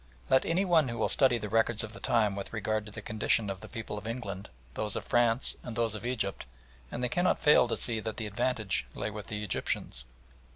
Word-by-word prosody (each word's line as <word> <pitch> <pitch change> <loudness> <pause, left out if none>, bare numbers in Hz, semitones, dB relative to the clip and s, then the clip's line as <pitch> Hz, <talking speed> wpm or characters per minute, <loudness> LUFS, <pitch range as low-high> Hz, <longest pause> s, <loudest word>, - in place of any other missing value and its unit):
Let 130 - +5
any 180 +4 +1
one 165 -6 +4
who 115 -1 -4
will 110 - +1
study 130 -3 +5
the 105 -2 -4
records 115 +1 +2
of 110 0 -7
the 115 - -10
time 110 -4 +2
with 100 -1 -5
regard 110 -1 -1
to - - -9
the 110 0 -8
condition 110 -1 +1
of 95 - -7
the 110 - -10
people 105 -1 -5
of 105 - -9
England, 110 -4 -5 0.2
those 105 +5 -2
of - - -4
France, 120 +1 +2
and 120 -3 -7
those 115 -2 +1
of 110 - -6
Egypt, 110 - -2 0.4
and 125 - -4
they - - +3
cannot 175 +8 +2
fail 150 -4 +5
to - - -1
see 115 -2 +2
that 110 0 -5
the 110 - -3
advantage 105 -1 0
lay 105 - -3
with 105 -1 -7
the 105 0 -4
Egyptians. 65 -9 -1
110 Hz, 235 wpm, -30 LUFS, 105-120 Hz, 0.4 s, Let